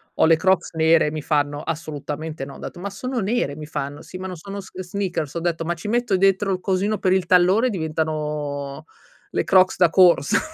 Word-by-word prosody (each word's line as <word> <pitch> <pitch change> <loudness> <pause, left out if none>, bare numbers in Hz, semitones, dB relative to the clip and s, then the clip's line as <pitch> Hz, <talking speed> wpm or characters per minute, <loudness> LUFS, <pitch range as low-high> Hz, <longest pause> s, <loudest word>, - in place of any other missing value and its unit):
Ho - - +4
le 165 0 +6
crocs 185 +1 +1
nere 160 0 +4
e - - -2
mi 155 0 -4
fanno: 145 -1 0
"Assolutamente 155 -1 -5
no". 140 - -10
Ho - - -12
detto: - - -8
"Ma 200 +3 -4
sono 250 +6 -4
nere", 205 - -1
mi 150 0 -8
fanno: 145 -1 -5
"Sì, 185 - -9
ma 185 - -7
non 185 -1 -5
sono 200 +4 -7
sn 185 -1 -9
sneakers". 180 -5 -3
Ho 170 - -2
detto: 165 -1 -1
"Ma 170 +1 -2
ci 170 +5 -8
metto 240 -4 +1
dentro 195 +1 +2
il 185 - -1
cosino 195 +3 0
per 185 -2 +1
il 190 -2 +1
tallone 185 +7 +4
e - - 0
diventano 150 - -3 0.5
le - - 0
crocs 185 -1 +4
da 175 -2 +5
corsa". 175 -6 +5
170 Hz, 220 wpm, -22 LUFS, 155-190 Hz, 0.5 s, le